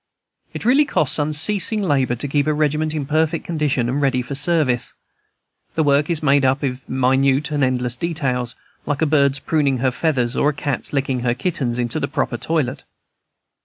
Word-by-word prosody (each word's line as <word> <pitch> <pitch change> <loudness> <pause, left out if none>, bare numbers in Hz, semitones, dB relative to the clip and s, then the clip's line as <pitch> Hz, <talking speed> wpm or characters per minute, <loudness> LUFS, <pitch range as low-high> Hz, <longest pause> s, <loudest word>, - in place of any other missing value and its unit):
It - - -7
really 270 +5 +4
costs 155 - 0
unceasing 160 +9 +2
labor 140 - +1
to 135 +4 -4
keep 145 +1 0
a 155 - +1
regiment 155 +1 0
in 150 -3 -2
perfect 155 +2 0
condition 150 -7 -1
and 135 +4 -1
ready 130 -3 +1
for 130 - -7
service. 145 -4 +1 0.8
The 160 - +2
work 145 +1 +2
is 165 -2 -1
made 140 -1 +3
up 135 +2 +1
of 130 -1 -4
minute 135 +3 +1
and 145 -2 0
endless 125 -1 0
details, 130 -7 -2 0.3
like 145 +1 -1
a - - +4
bird's 140 -2 +2
pruning 140 -2 0
her 130 +1 +1
feathers 125 -4 -1
or 145 - +2
a - - -2
cat's 145 -1 -3
licking 135 -2 -1
her 120 0 0
kittens 130 -4 -2
into 120 -1 -1
their - - -2
proper 145 -4 -2
toilet. 145 -3 -2
140 Hz, 185 wpm, -20 LUFS, 130-155 Hz, 0.8 s, really